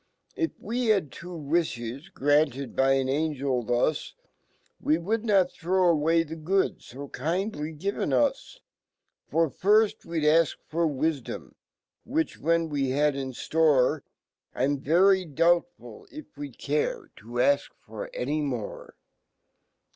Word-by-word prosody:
If 330 -4 -2
we 240 +3 -2
had 210 -3 +4
had 145 - -17
two 175 +1 -8
wlfhes, 145 -2 -2
granted 140 -2 +1
by 135 0 +4
an 135 -1 +1
Angel 140 -3 0
fhus, 120 +6 0 0.7
We 155 - +2
would 210 +6 -1
not 195 -5 +3
throw 185 +1 +1
away 165 +1 +2
fhe 160 0 -9
good 190 +4 +1
fo 140 +3 -9
kind 180 - -2
ly 150 +1 -4
given 175 0 -2
us. 125 -3 0 0.7
Fr 165 +2 +2
firft 210 +7 +2
we'd 165 -2 -3
afk 155 +2 +4 0.2
fbrwifdorn 155 -3 -2 0.5
,which, 315 +6 -2
when^7e 160 -4 +1
had 150 0 +3
inftore, 140 +1 +1 0.5
I'm 140 +2 0
very 185 +7 +4
doubtful 175 - 0
if 305 -1 -11
we'd 290 -1 -8
care 460 -4 -2
to - - -16
afk 140 +4 +2 0.2
for - - -7
anymore. 145 - -3
160 Hz, 125 wpm, -27 LUFS, 140-190 Hz, 0.7 s, had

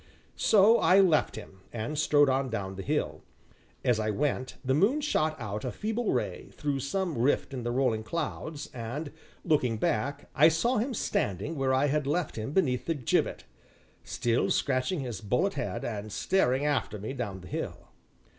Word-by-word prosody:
So 220 +2 +5
I 190 - +5
left 175 -6 +3
him, 95 -3 -10
and 115 +6 -4
strode 145 -1 +4
on 130 0 +1
down 95 -4 -4
the 95 - -5
hill. 95 - -2 0.6
As 120 -3 +3
I 110 0 0
went, 130 +2 -1
the 130 - +2
moon 200 - +3
shot 155 - 0
out 105 -2 -4
a 125 - -2
feeble 220 - -2
ray, - - -2
through 145 -2 -2
some 165 +2 -2
rift 135 +2 +1
in 130 - -4
the 120 - -2
rolling 120 -3 +1
clouds, 155 +3 -4
and, 130 +6 -5 0.3
looking 130 -9 +2
back, 140 +7 -1
I 150 +2 +6
saw 190 +11 +2
him 245 +3 -1
standing 125 - -1
where 135 -2 +1
I 130 +2 +3
had 145 0 0
left 165 +3 -1
him 110 +4 -4
beneath 145 -8 +1
the 165 - +1
gibbet, 125 -6 0 0.6
still 120 0 0
scratching 135 +5 0
his 120 -7 -5
bullethead, 125 - -1
and 105 -2 -4
staring 140 - +1
after 135 -8 0
me 110 +6 -5
down 105 -8 -4
the 90 - -11
hill. - - -5
135 Hz, 175 wpm, -29 LUFS, 115-160 Hz, 0.6 s, I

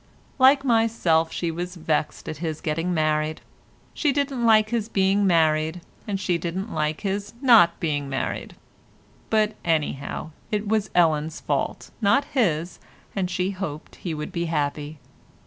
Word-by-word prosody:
Like 270 +1 +6
myself, 225 -9 +2
she 170 -2 -2
was 175 +2 -5
vexed 155 -2 -2
at 155 - -5
his 160 -1 -3
getting 165 +3 -1
married. 155 -1 0 0.5
She 295 - +1
didn't 275 -3 -1
like 215 -1 +5
his 230 -2 -1
being 195 0 +2
married, 160 -1 +2 0.3
and 200 -2 -2
she 180 -3 0
didn't 185 +6 -4
like 155 0 -1
his 200 +2 -3
not 230 -11 +6
being 145 -4 -1
married—but, 215 +9 -4
anyhow, 155 -1 -2 0.2
it 210 0 -2
was 215 -1 +1
Ellen's 160 -2 +2
fault, - - -2
not 225 +7 +3
his, 175 - 0 0.4
and 190 -3 -1
she 185 +1 -1
hoped 170 -6 -6
he 170 -4 -4
would 150 0 -5
be 170 -1 -2
happy. 150 -1 -2
175 Hz, 145 wpm, -24 LUFS, 155-210 Hz, 0.5 s, Like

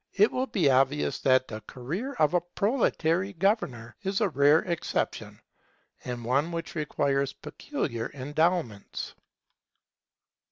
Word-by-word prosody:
It 205 +2 +5
will 260 +1 -1
be 180 - +1
obvious 135 +2 +2
that 130 -1 +3
the 110 -1 -7
career 175 - -4
of 155 - +2
a 175 - +3
proletary 190 -2 0
governor 165 - 0
is 195 0 -1
a 210 -4 +2
rare 145 +2 +5
exception, 170 -3 -2 0.6
and 120 -2 -5
one 140 +7 +1
which 165 0 -4
requires 140 -3 0
peculiar 115 -1 -4
endowments. 145 - -1
155 Hz, 120 wpm, -28 LUFS, 130-190 Hz, 0.6 s, It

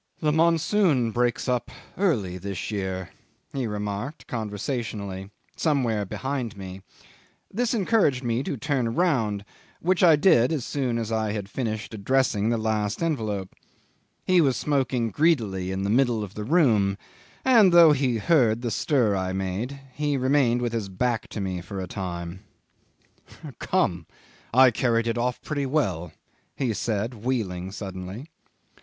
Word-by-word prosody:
"The 155 -2 +1
monsoon 165 - +3
breaks 120 0 0
up 125 -1 0 0.3
early 105 - 0
this 100 +2 -5
year," 95 -3 -3 0.4
he 130 -4 -1
remarked 105 +6 -4
conversationally, 105 -3 -4 0.3
somewhere 125 -9 +1
behind 130 +1 -4
me. 95 0 -8 0.7
This 240 +3 0
encouraged 190 - +2
me 120 0 0
to 140 - -3
turn 125 -3 -1
round, 115 - +1 0.3
which 180 +1 +1
I 165 -3 +8
did 145 -6 +4
as 150 -7 -1
soon 130 -5 -1
as 115 -1 -3
I 110 -2 0
had 105 -2 -4
finished 110 0 -4
addressing 110 0 +1
the 120 - +1
last 110 +3 -1
envelope. 110 - -2 0.7
He 185 -1 +5
was 135 -5 +2
smoking 130 -5 0
greedily 110 - +1
in 95 0 -2
the 100 - -1
middle 120 -3 +2
of 100 -2 -8
the 105 0 -5
room, 110 - +3 0.5
and 225 -8 +6
though 170 -2 +8
he 130 -5 +1
heard 120 -3 +3
the 120 - -1
stir 120 -8 +2
I 95 -1 -2
made, 95 +9 -3
he 145 0 0
remained 130 -2 +2
with 120 -1 -1
his 110 -4 -2
back 115 +4 -1
to - - -6
me 95 -2 -3
for 95 +2 -7
a 95 - -3
time. 90 -1 -5 1.2
'"Come 85 -2 0 0.4
I 130 +1 +7
carried 115 0 +1
it 115 0 -1
off 125 +1 -1
pretty 145 -3 -2
well," 95 - -1 0.4
he 125 -5 -1
said, 110 +3 -2
wheeling 95 -8 -2
suddenly. 95 - -7
115 Hz, 150 wpm, -25 LUFS, 100-140 Hz, 1.2 s, I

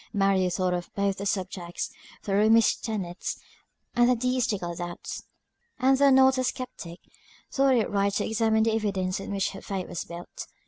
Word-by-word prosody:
Mary 195 -2 +2
thought 180 0 0
of 175 -1 -3
both 200 -1 0
the 200 - -2
subjects, 185 -3 -3 0.3
the 200 - -2
Romish 220 +3 +5
tenets, 190 -5 -4 0.6
and 240 0 +4
the 250 - +4
deistical 230 -8 -1
doubts; 175 0 -6 0.5
and 265 +1 +3
though 280 0 +6
not 265 0 +5
a - - +1
sceptic, 215 -10 -5 0.5
thought 270 -1 +3
it 230 - +2
right 200 0 +1
to - - 0
examine 220 0 +2
the 225 0 +2
evidence 195 -4 -1
on - - -7
which 195 -1 -1
her 195 - -9
faith 190 -2 -4
was 175 - -4
built. 170 +1 -8
200 Hz, 175 wpm, -27 LUFS, 185-230 Hz, 0.6 s, though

